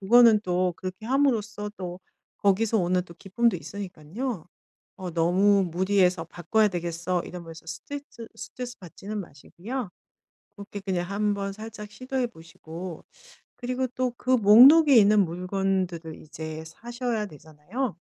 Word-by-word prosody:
그거는 225 +1 +6
또 180 0 +1
그렇게 185 +4 -7
함으로써 230 -6 +1
또 180 -1 -6 0.4
거기서 210 +3 +2
오는 180 0 +2
또 170 - -13
기쁨도 230 +6 +1
있으니깐요. 200 - -6 0.5
어 185 -3 -5
너무 190 +4 +4
무리해서 180 0 +2
'바꿔야 175 +6 +1
되겠어.' 175 -1 -2
이러면서 165 -2 -9
스테쯔 235 - -8
스트레스 250 -1 -7
받지는 200 +4 -7
마시고요 195 - -7 0.7
그렇게 200 0 -8
그냥 185 -2 -2
한번 200 -1 -1
살짝 215 0 -8
시도해 255 +3 -2
보시고 165 -2 -9 0.5
그리고 255 +1 -2
또 255 -1 0
그 255 - -7
목록에 255 +7 +8
있는 210 -1 +6
물건들을 180 -2 -2
이제 160 0 -7
사셔야 235 +3 -4
되잖아요. 160 - -5
195 Hz, 315 characters per minute, -26 LUFS, 175-225 Hz, 0.7 s, 목록에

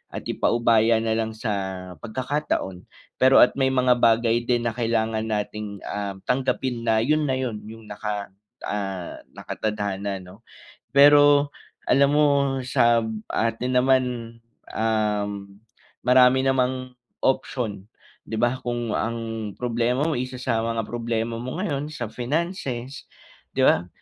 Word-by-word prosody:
at - - -5
ipaubaya 115 -1 +3
na 115 - 0
lang 110 0 0
sa 110 0 -3 0.5
pagkakataon. 120 -6 -3 0.3
Pero 130 +1 +5
at 125 - +4
may 135 - +3
mga 125 -2 +3
bagay 115 0 +3
din 120 -1 +1
na 115 - 0
kailangan 115 -2 0
nating, 105 -1 -4
ah, 100 -1 -4
tanggapin 125 -1 -1
na 110 -1 +4
’yon 155 +4 +2
na 130 - +1
’yon, 125 -5 -3
’yong 115 +1 -10
naka, 105 -1 -5 0.3
ah, 95 -4 -4 0.2
nakatadhana 100 -2 -3
’no. 90 +3 -14 0.5
Pero, 145 0 +6 0.4
alam 140 0 +5
mo, 150 0 +4 0.4
sa 120 -2 +3 0.3
atin 115 +3 -1
naman, 130 +1 +4 0.7
um, 105 -3 -1 0.5
marami 125 +1 +6
namang 130 -1 0 0.3
option, 120 -6 -1 0.4
’di 110 - -3
ba? 120 +3 +1
Kung 120 -2 -3
ang 115 -2 -3
problema 125 +2 0
mo, - - 0
isa 125 +1 -4
sa 115 -3 0
mga 115 0 -2
problema 115 0 -2
mo 130 +4 -5
ngayon 150 -7 -2
sa 150 -6 -5
finances, 135 0 -3 0.5
’di - - +3
ba? 85 +2 +3
120 Hz, 130 wpm, -24 LUFS, 110-130 Hz, 0.7 s, Pero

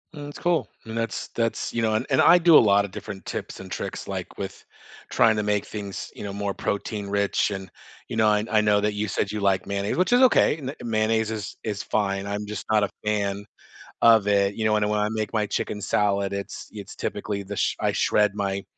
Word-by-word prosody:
Mm, 145 -1 -7
it's 145 - -10
cool, 175 -2 +1 0.2
and 110 +1 -6
that's 115 0 -3
that's, 115 -1 -1
you 115 - 0
know 110 -1 +1
and 110 +4 0
and 130 - +2
I 175 - +7
do 170 -2 +7
a - - +9
lotta 100 -2 +3
different 100 0 -8
tips - - -5
and - - -11
tricks, - - -5
like, - - -5
with - - -6 0.5
trying 115 -1 +4
to 105 - 0
make 105 -1 0
things, 100 -2 -6
you - - -9
know, 100 -1 -5
more 100 -1 -2
protein-rich, 100 0 -1
and, 95 -1 -5 0.4
you 115 - -4
know 110 -1 +4
and 105 +1 -1
I 110 - +4
know 105 -1 +3
that 105 0 0
you 105 +1 -2
said 100 0 -1
you 105 - -3
like 100 -2 +1
mayonnaise, 100 0 -2
which 185 +4 +2
is 245 - +5
okay, 250 - +5
n 135 -3 -5
mayonnaise 110 -1 +1
is 105 -2 -5
is 105 -1 -3
fine, 100 -2 -1
I'm 100 +1 -3
just 105 0 -6
not 105 -1 +4
a 100 - 0 0.2
fan 100 -1 -1 0.6
of 115 -3 +6
it, 100 -1 +2
you 110 - -2
know, 110 0 +3
and 105 0 +1
when 105 0 +1
I 105 - +1
make 110 -2 -2
my 110 -2 +1
chicken 105 0 -3
salad, 100 0 +1
it's 100 0 -6
it's 100 -2 -9
typically 100 -1 -3
the 100 +1 -6
sh - - 0
I - - +1
shred 105 -1 +2
my 100 -1 -2
105 Hz, 230 wpm, -25 LUFS, 100-110 Hz, 0.6 s, a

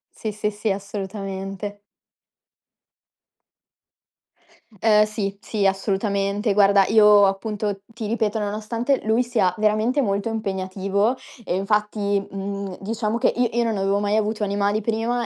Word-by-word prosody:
Sì, 220 - -4
sì, 210 0 -2
sì. 210 +1 -3
Assolutamente. 195 0 -5 3.0
Ehm, 215 -1 +5
sì, 205 -2 -3
sì, 205 -3 -2
assolutamente. 200 +1 0
Guarda, 200 -1 +5
io 210 -2 +6
appunto, 200 0 -2
ti 225 -1 -6
ripeto: 220 -1 0
nonostante 220 +5 -1
lui 220 +3 +2
sia 225 -7 +1
veramente 215 +6 +2
molto 200 -1 -1
impegnativo 200 +2 -1 0.3
e 180 - -2
infatti, 205 0 0
mhmm, 195 -1 -5
diciamo 220 +2 -2
che - - +2
i 240 -1 0
io 235 - +3
non 225 - 0
avevo 195 +1 +1
mai 205 +1 0
avuto 215 0 0
animali 200 +1 0
prima, 230 +2 -1
210 Hz, 125 wpm, -23 LUFS, 195-220 Hz, 3.0 s, io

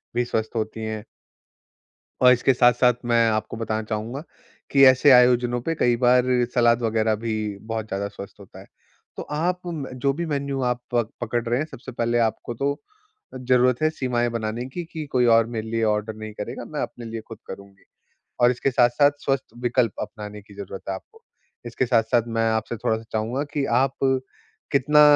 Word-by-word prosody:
भी 120 0 +1
स्वस्थ 110 -2 -2
होती 110 0 -3
हैं। 110 -1 -4 1.2
और 125 0 +8
इसके 125 +2 +2
साथ-साथ 125 0 +4
मैं 115 -1 +3
आपको 110 0 -2
बताना 110 -1 -2
चाहूँगा 115 +6 -4 0.5
कि 140 -1 +5
ऐसे 130 +2 +6
आयोजनों 125 -1 +5
पे 165 +6 -2
कई 120 -5 +2
बार 125 0 +5 0.3
सलाद 120 -1 +3
वग़ैरह 110 -1 +1
भी 110 +1 -3 0.4
बहुत 110 -1 -3
ज़्यादा 100 0 -3
स्वस्थ 100 -1 -11
होता - - -13
है। - - -14 0.5
तो - - -4
आप 175 +4 0
म 160 -5 -4
जो 140 +2 +1
भी 170 +4 -3
मेन्यू 140 -3 -2
आप 125 0 0
प 120 -2 +1
पकड़ 120 0 -1
रहे 120 +2 +1
हैं, 155 - -1
सबसे 130 +2 -9
पहले 120 0 0
आपको 115 +1 -1
तो 140 +4 -1 0.7
ज़रूरत 125 0 +3
है 155 - +4
सीमाएँ 125 -5 -1
बनाने 115 +1 -3
की 175 - -4
कि 160 -2 -4
कोई 125 -1 +3
और 115 -1 +5
मेरे 110 0 -3
लिए 115 0 0
ऑर्डर 105 0 0
नहीं 110 0 -8
करेगा, 105 - -6
मैं - - -5
अपने 120 - -6
लिए 115 0 -5
खुद 115 - -9
करुँगी। 100 0 -11 0.6
और 120 0 +6
इसके 125 +2 -1
साथ-साथ 125 +4 +4
स्वस्थ 135 -1 0 0.2
विकल्प 120 -2 +2
अपनाने 105 0 -7
की 100 0 -17
ज़रूरत 100 -1 -7
है - - -1
आपको। 95 - -14 0.4
इसके 120 +2 -1
साथ-साथ 115 -1 +2
मैं 115 -1 0
आपसे 110 +1 -2
थोड़ा-सा 110 +1 -1
चाहूँगा 115 +6 -1
कि 140 -2 0
आप 130 +2 +2 0.8
कितना 150 +2 +4
120 Hz, 185 wpm, -23 LUFS, 110-130 Hz, 1.2 s, और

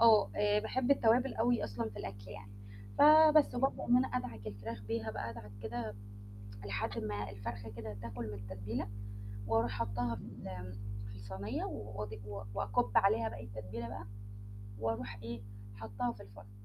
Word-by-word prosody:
آه 225 -2 +8
آآ 210 0 +4
باحب 260 +4 0
التوابل 250 0 +5
أوي 240 +1 +3
أصلًا 110 0 -2
في 105 - -9
الأكل 100 +1 -6
يعني. 105 -1 -9 0.5
فبس 310 0 +9
وبابدأ 265 +2 +1
إن 245 - +6
أنا 255 0 +3
أدعك 110 - -4
الفراخ 105 +1 -5
بيها 110 +1 -1
بقى 115 +2 -3
أدعك 115 -3 -9
كده 110 -1 -3 0.7
لحد 100 +1 -1
ما 105 -1 -2
الفرخة 100 +1 -5
كده 110 -1 -6
تاكل 115 0 -4
من 105 - -4
التتبيلة، 100 +2 -4 0.6
وأروح 115 +1 +3
حاطاها 115 +3 0
في - - -8
ال 100 -3 -8
آمم 95 0 -5 0.4
في 100 - -8
الصينية 100 +1 -3
وأض 105 0 -4
و 100 0 -5
وأكُب 100 -1 +1
عليها 115 - +5
باقي 110 +1 -7
التتبيلة 110 +2 -5
بقى 110 -2 -6 0.7
وأروح 115 -1 -2
إيه 115 -2 -5 0.3
حاطاها 110 +3 -2
في 100 - -11
الفرن. 100 0 -13
110 Hz, 160 wpm, -35 LUFS, 100-120 Hz, 0.7 s, فبس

